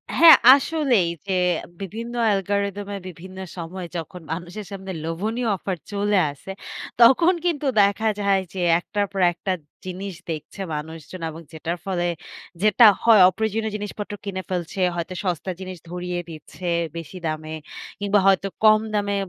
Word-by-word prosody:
হ্যাঁ, 335 -1 +10 0.2
আসলেই 275 - +2 0.2
যে, 195 - -1 0.5
বিভিন্ন 225 +5 -6
অ্যালগরিথম 200 0 0
এ - - -3
বিভিন্ন 185 +2 -11 0.2
সময় 175 +2 -6
যখন 180 +2 -7
মানুষের 180 +5 -7
সামনে 190 -1 -6
লোভনীয় 215 +9 -2
অফার 190 -1 -4
চলে 205 0 +1
আসে, 145 +7 -10 0.5
তখন 300 +10 +7
কিন্তু 305 -4 0 0.2
দেখা 205 +2 +2
যায় 200 -1 +2
যে, 190 - -5 0.2
১ - - -16
টার 205 -1 +2
পর 195 -1 -2
একটা 190 +3 -3 0.3
জিনিস 185 0 -5 0.2
দেখছে 155 +5 -6
মানুষজন 160 +3 -7
এবং 160 +1 -9
যেটার 165 +2 -3
ফলে 180 -3 -1 0.6
যেটা 215 +3 +6 0.2
হয় 225 -4 +7
অপ্রয়োজনীয় 220 +2 -2
জিনিসপত্র 210 0 -6
কিনে 190 -2 -3
ফেলছে, 180 0 -3 0.2
হয়তো 170 +2 -4
সস্তা 185 0 -2
জিনিস 185 -1 -7
ধরিয়ে 180 0 -3
দিচ্ছে 165 +3 -9 0.3
বেশি 165 +3 -7
দামে 155 0 -4 0.5
কিংবা 205 0 +2
হয়তো 195 0 +4 0.2
কম 215 0 +7
দামে 200 -1 0
195 Hz, 145 wpm, -23 LUFS, 175-210 Hz, 0.6 s, হ্যাঁ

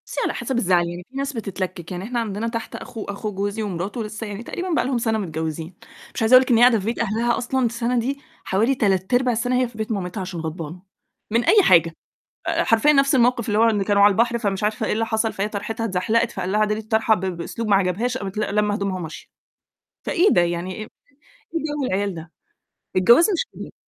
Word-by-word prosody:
بُصّي - - -4
على - - 0
حسب 265 - -3
الزعل، 180 -6 +2
يعني 175 +1 -7
في 270 - -8
ناس 275 +1 -2
بتتلكِك، 185 -6 -5
يعني 180 0 -4
إحنا 240 +3 -2
عندنا 220 0 -3
تحت 230 -1 -5
أخو 225 -3 -7
أخو 200 +1 -4
جوزي 205 +3 -2
ومراته، 200 +4 -3
لسّه 215 +1 -6
يعني 205 +2 -6
تقريبًا 360 +9 -5
بقى - - +1
لهم 260 -1 0
سَنة 225 -1 0
متجوّزين، 160 -2 -4 0.4
مش - - -3
عايزة 225 +2 +3
أقول 255 - +9
لِك 260 - -3
إن - - +6
هي - - +3
قاعدة 245 -3 +6
في 195 - -7
بيت 230 +2 -2
أهلها 230 +2 0
أصلًا 255 +1 0
السَنة 235 +1 0
دي 275 +4 -3 0.2
حوالي 225 +8 +1
تلات 195 -3 0
أرباع 250 0 +3
السَنة 245 +2 0
هي 250 - +1
في 235 -2 -15
بيت 220 +1 -3
مامتها 190 -1 -3
عشان 180 -2 -5
غضبانة، 165 +1 -6 0.5
من 230 +2 +2
أي 415 - +5
حاجة 165 - +5 0.6
آآ - - +1
حرفيًا 225 +7 +4
نفس 275 -1 +3
الموقِف، 245 -2 +2
اللي 210 0 +1
هو 225 - +5
إن 205 -2 0
كانوا 200 0 +3
على 205 - +8
البحر 235 +3 +1
فمش 200 -2 -2
عارفة 220 +2 -1
إيه - - 0
اللي 225 +1 0
حصل، 220 0 0
فهي 200 +2 -2
طرحِتها 220 +2 -4
اتزحلقِت، 225 +4 +1
فقال 185 - -4
لها: 210 - +2
"اعدلي 210 0 +1
الطرحة." 220 0 +2
ب 205 - -5
بأسلوب 185 +5 -4
ما 200 - +5
عجبهاش، 200 +7 0
قامت 195 -1 -6
ل - - +1
لامة 210 -1 +2
هدومها، 200 -2 -2
وماشية. 160 -3 -8 0.8
فإيه 365 +4 +3
ده 175 - +4
يعني 175 +2 -2
إيه - - -7 0.7
إيه 330 - 0
جَو 295 -2 -3
العيال 200 -3 -1
ده؟ 160 0 -9 0.7
الجواز 235 - +6
مش 365 - 0 0.3
ك - - -44
215 Hz, 230 wpm, -22 LUFS, 190-235 Hz, 0.8 s, أقول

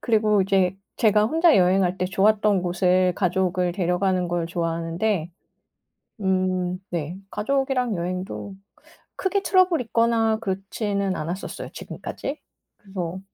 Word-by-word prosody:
그리고 215 -3 +3
이제 190 -1 +1 0.2
제가 215 -2 +4
혼자 325 - +4
여행할 185 0 +3
때 185 - 0
좋았던 205 0 +2
곳을 180 +1 +2
가족을 180 -1 0
데려가는 180 0 0
걸 170 -1 -1
좋아하는데. 170 +2 -1 0.9
음 185 -1 0
네. 170 +1 -3
가족이랑 260 -1 0
여행도 185 +3 -4 0.6
크게 390 +1 0
트러블이 370 -7 +3
있거나 230 -1 +2
그렇지는 195 0 -2
않았었어요 170 +5 -5
지금까지. 285 +3 -6 0.4
그래서 185 -3 -5
190 Hz, 295 characters per minute, -24 LUFS, 180-215 Hz, 0.9 s, 제가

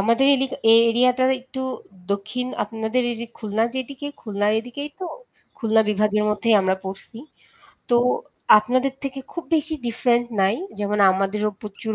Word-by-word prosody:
আমাদের 230 +6 +3
এলি 270 0 0 0.3
এই 230 - +8
এরিয়াটা 250 +2 +2 0.2
একটু 260 +1 -8 0.5
দক্ষিণ 210 +5 -3 0.2
আপনাদের 220 +3 -1
এই 235 - -3
যে 235 - -4
খুলনার 220 +1 0
যেদিকে, 265 +2 -4
খুলনার 205 -1 0
এদিকেই 265 +5 -7
তো। 370 - -4 0.5
খুলনা 225 -3 +3
বিভাগের 210 0 +2
মধ্যেই 210 +2 +2
আমরা 190 0 +1
পড়ছি, 195 +4 -8 0.7
তো 240 - +5 0.6
আপনাদের 255 +5 0
থেকে 275 -1 -4
খুব 340 - -6
বেশি 315 +1 +2
different 240 +1 +1
নাই। 195 +2 +3 0.2
যেমন 210 0 -1
আমাদেরও 195 +3 -1
প্রচুর 215 +1 -5
225 Hz, 145 wpm, -22 LUFS, 210-255 Hz, 0.7 s, এই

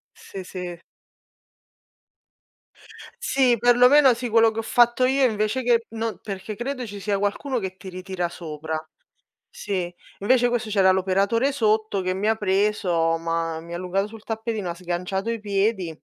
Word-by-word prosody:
Sì, 190 -1 -9
sì. 180 -2 -7 2.4
Sì, 265 - +3
per 245 +1 +4
lo 250 - +8
meno, 270 -3 +6
sì. 245 +1 -4
Quello 225 0 +5
che 220 - -8
ho - - 0
fatto 240 +2 +3
io, 265 +1 +2
invece, 215 +3 -1
che 235 -2 +2
no 225 0 -4
perché 200 +1 -6
credo 250 +2 -4
ci 205 -1 -8
sia 200 0 -1
qualcuno 235 +6 -1
che 190 -2 -5
ti 195 - -12
ritira 185 -1 -4
sopra. 160 -2 -6 0.8
Sì, 185 - -4 0.3
invece 245 +4 +3
questo 240 -2 -2
c'era 195 -2 +4
l'operatore 195 +8 +1
sotto 215 -5 +1
che 185 0 -1
mi 195 +3 -2
ha 220 0 +3
preso, 190 -5 +1
m'ha 165 -1 -2
mi 170 +1 -9
ha - - -2
allungato 185 +3 -1
sul 220 0 -12
tappetino, 220 -4 -3
ha - - -4
sganciato 180 +3 -3
i 230 -1 -2
piedi. 200 -2 0
205 Hz, 165 wpm, -24 LUFS, 185-230 Hz, 2.4 s, lo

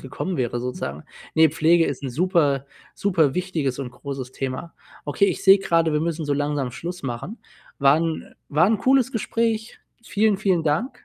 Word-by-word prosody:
gekommen 155 +6 -4
wäre 120 -1 -1
sozusagen. 75 - -5 0.3
Ne, 160 -1 +5
Pflege 165 +2 +3
ist 140 -2 -3
‘n 135 - -3
super 145 -2 +1 0.3
superwichtiges 165 -6 0
und 130 -3 -5
großes 130 0 -7
Thema. 135 +5 -5 0.3
Okay, 150 +7 +2
ich - - -2
sehe 195 +1 +8
grade, 165 -4 +1
wir 150 - +1
müssen 165 -1 -2
so 145 - -1
langsam 145 -2 -1
Schluss 175 +6 -7
machen. 135 - -5 0.4
War 140 +2 +5
‘n 165 -1 -3
war 155 +4 +3
‘n 215 0 +2
cooles 265 +2 +3
Gespräch. 225 0 -1 0.2
Vielen, 210 -2 +1
vielen 185 -5 +1
Dank. 160 - -2
160 Hz, 170 wpm, -23 LUFS, 140-190 Hz, 0.4 s, sehe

